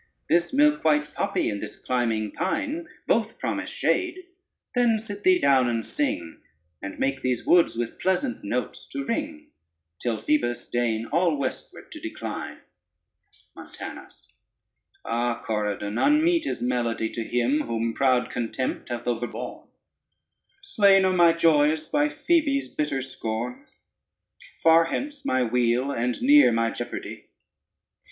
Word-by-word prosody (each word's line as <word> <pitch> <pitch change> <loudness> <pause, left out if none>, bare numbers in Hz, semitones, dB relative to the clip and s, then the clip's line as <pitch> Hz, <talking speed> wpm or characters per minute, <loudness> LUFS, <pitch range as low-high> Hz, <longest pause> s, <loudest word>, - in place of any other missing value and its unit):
This 170 +1 +2
milk 300 +2 +3
white 150 -1 +2
poppy, 200 0 -1
and 100 - -5
this - - -6
climbing 115 -4 -1
pine 300 +2 -2 0.2
Both - - +1
promise - - -3
shade; 360 -1 0 0.6
then 240 -3 +3
sit 205 -2 -7
thee 185 -1 +5
down 135 -6 +3
and 115 -1 -2
sing, 85 - -3 0.4
And 100 - -6
make 135 0 -1
these 125 -2 -1
woods 175 -7 +4
with 120 -1 -4
pleasant 245 +8 -1
notes - - -3
to 280 -2 -3
ring, 300 +4 -4 0.5
Till 120 -2 -1
Phoebus 120 -2 0
deign 115 -2 0
all 165 +2 +1
westward 140 - -5
to 310 - -8
decline. 315 -1 -6 0.9
[Footnote - - -10
1: - - -15
weep.] - - -16
MONTANUS - - -10 0.7
Ah, 120 0 -1
Corydon, 105 0 -2
unmeet 320 +3 +3
is - - -3
melody 120 -2 0
To 115 - -4
him 125 +6 +1
whom 115 0 -1
proud 130 -1 +2
contempt 125 +2 -3
hath 120 -1 -4
overborne: 120 0 -4 1.0
Slain 200 - +4
are 185 - +2
my 175 -2 +6
joys 155 -2 +3
by 295 0 +1
Phoebe's 295 -4 +1
bitter 145 -3 -2
scorn; 125 -2 -5 1.0
Far 165 0 +6
hence 285 - -4
my 130 - +1
weal, 125 +3 +1
and 125 -1 -1
near 290 +2 +7
my 115 0 +1
jeopardy. 120 - -7
145 Hz, 140 wpm, -25 LUFS, -, 1.0 s, near